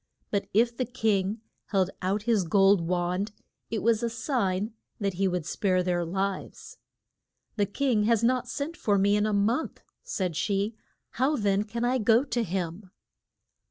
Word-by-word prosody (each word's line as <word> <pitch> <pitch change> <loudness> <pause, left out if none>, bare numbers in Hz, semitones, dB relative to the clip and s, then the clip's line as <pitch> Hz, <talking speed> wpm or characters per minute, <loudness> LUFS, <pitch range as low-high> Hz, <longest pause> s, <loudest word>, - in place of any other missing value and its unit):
But 200 -1 0
if 235 +3 +3
the 255 - -1
king 215 -3 0 0.3
held 190 -2 +1
out 195 +3 0
his 220 -4 +2
gold 195 +2 +4
wand 180 +4 -1 0.4
it 220 -3 -2
was 225 -1 +3
a 235 - 0
sign 220 -4 -1 0.3
that 200 -2 -1
he 195 +2 +1
would 180 -3 -2
spare 185 +1 +1
their 175 -1 0
lives. 190 +3 -4 0.8
The 205 -2 +1
king 230 -1 +1
has 230 0 +3
not 250 +1 +2
sent 300 +4 -4
for 205 -9 +1
me 200 +1 +3
for 210 - +2
a - - -1
month, 220 +9 0 0.2
said 180 -5 -3
she. 200 +5 0 0.4
How 265 +5 +1
then 200 -4 +1
can 235 +2 -3
I 255 +1 +2
go 225 +3 +4
to 255 -4 -1
him? 185 0 -4
205 Hz, 165 wpm, -27 LUFS, 190-230 Hz, 0.8 s, gold